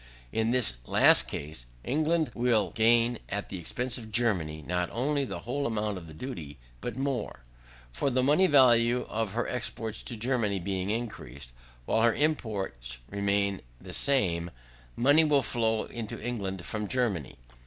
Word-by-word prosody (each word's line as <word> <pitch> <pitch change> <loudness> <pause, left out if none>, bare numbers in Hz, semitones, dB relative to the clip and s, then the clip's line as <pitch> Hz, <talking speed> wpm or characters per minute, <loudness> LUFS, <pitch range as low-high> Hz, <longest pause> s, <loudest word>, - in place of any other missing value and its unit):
In 110 0 +1
this 120 - +2
last - - +5
case, 70 -5 -6 0.2
England 155 0 +1
will 115 -6 +2
gain, 115 +3 +3
at 100 0 -3
the 95 - -5
expense 125 +9 -2
of 110 -2 -10
Germany, 90 -10 0
not 90 0 -1
only 140 +4 0
the - - -6
whole 140 +4 -2
amount 105 -3 -2
of 85 - -12
the 80 - -11
duty, 80 - -7 0.2
but 120 -1 -4
more. 135 -5 -2 0.5
For - - 0
the 130 0 +1
money 150 +8 +5
value 125 -4 +5
of 110 -2 -2
her 120 +2 -1
exports 115 -3 -4
to 120 - -6
Germany 115 -4 0
being 95 +1 -2
increased, 75 - -5 0.3
while 110 - +2
her 115 0 +4
imports 100 - -1
remain 100 -1 0 0.2
the - - -9
same, 90 -12 +2 0.5
money 145 +6 +5
will 145 -3 +3
flow 110 -2 0
into 115 -3 -6
England 95 -7 -4
from 105 -1 -3
Germany. 105 - -1
110 Hz, 155 wpm, -29 LUFS, 95-125 Hz, 0.5 s, last